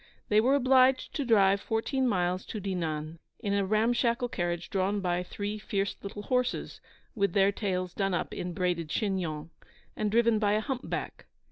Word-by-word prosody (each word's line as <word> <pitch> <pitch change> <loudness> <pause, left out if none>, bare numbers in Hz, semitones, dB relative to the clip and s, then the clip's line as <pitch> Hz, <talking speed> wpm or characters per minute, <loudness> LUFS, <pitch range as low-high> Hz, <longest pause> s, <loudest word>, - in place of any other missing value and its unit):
They 210 +1 +5
were 260 +5 +3
obliged 260 -1 +4
to 285 - -2
drive 200 -4 +4
fourteen 255 +4 0
miles 180 -3 0
to 215 - -5
Dinan 165 -5 -3 0.2
in 205 -4 -2
a 200 0 +2
ram 215 +4 +2
shackle 240 0 +1
carriage 175 -4 -3
drawn 195 +1 +1
by 180 -2 0
three 205 +3 -4
fierce 200 -1 -2
little 205 +1 -7
horses, 250 +2 -1 0.3
with 200 -5 0
their 195 0 +4
tails 185 -3 -2
done 195 -2 0
up - - -3
in 180 - -4
braided 175 -2 -1
chignons, 170 -6 -2 0.4
and 210 - -1
driven 230 0 +3
by 205 -1 +2
a 210 - +3
humpback. 260 +2 -4
200 Hz, 170 wpm, -29 LUFS, 180-230 Hz, 0.4 s, They